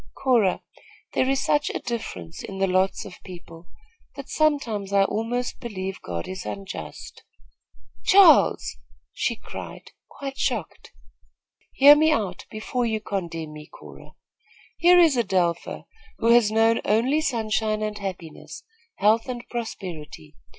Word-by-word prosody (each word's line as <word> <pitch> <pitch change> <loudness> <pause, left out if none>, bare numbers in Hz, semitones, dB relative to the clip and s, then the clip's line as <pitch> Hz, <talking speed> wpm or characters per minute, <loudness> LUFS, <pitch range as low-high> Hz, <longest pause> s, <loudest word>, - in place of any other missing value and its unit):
"Cora, 235 -8 +2 0.5
there 260 - +1
is 270 0 0
such 295 0 +2
a - - -3
difference 95 - -6
in 195 - -7
the 195 - +2
lots 185 +1 0
of 185 - -12
people, 170 -2 -12 0.5
that 275 -1 -9
sometimes 245 -11 0
I 200 0 +4
almost 235 +5 -2
believe 195 -5 -5
God 85 -2 -5
is 185 -1 -6
unjust." 195 -1 -8 0.8
"Charles!" 380 -4 +5 0.4
she - - -1
cried, - - -10 0.2
quite 275 -1 -7
shocked. 220 - -3 0.8
"Hear 285 +2 +8
me 315 +1 +3
out, 210 -10 -2
before 235 +3 -2
you 220 -1 -1
condemn 170 -7 -5
me, 150 0 -11
Cora. - - -14 0.6
Here 355 +1 +6
is 330 -5 +5
Adelpha, 185 -7 -1 0.3
who 230 - +1
has 235 -3 +5
known 225 +1 +3
only 245 +9 +2
sunshine 220 -5 -1
and 210 -1 -4
happiness, 180 -5 -7 0.3
health 220 +4 +2
and 240 -2 -6
prosperity. 175 - -7
215 Hz, 130 wpm, -24 LUFS, 185-250 Hz, 0.8 s, Hear